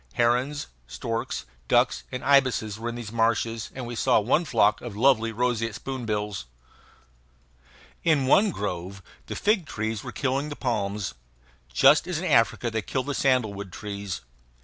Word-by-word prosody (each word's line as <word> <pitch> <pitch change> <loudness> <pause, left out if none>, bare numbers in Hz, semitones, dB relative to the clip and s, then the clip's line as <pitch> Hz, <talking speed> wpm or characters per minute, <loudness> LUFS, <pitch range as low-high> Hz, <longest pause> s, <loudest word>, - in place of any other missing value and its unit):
Herons, 125 +5 +1 0.2
storks, 115 - -4 0.2
ducks, - - +2
and 125 - -5
ibises 130 -6 +3
were 120 +1 -3
in 120 - -5
these 115 -3 -6
marshes, 115 -1 0
and 130 -2 -5
we 120 - -6
saw 115 - +3
one 130 +11 +2
flock 105 -6 +3
of 115 -4 -7
lovely 115 -2 +4
roseate 115 -1 -1
spoonbills. 105 - -3 1.6
In 155 -5 +3
one 200 +11 +5
grove 95 - -4 0.2
the - - -5
fig 205 -6 +1
trees 110 -2 -3
were - - -6
killing 140 +2 -1
the 145 - -5
palms, 100 - -2 0.6
just - - +5
as - - -2
in - - -3
Africa 120 - +3
they 110 0 -1
kill 130 +5 -2
the 145 - -3
sandalwood 110 -9 0
trees. 100 -6 -5
115 Hz, 150 wpm, -26 LUFS, 105-130 Hz, 1.6 s, one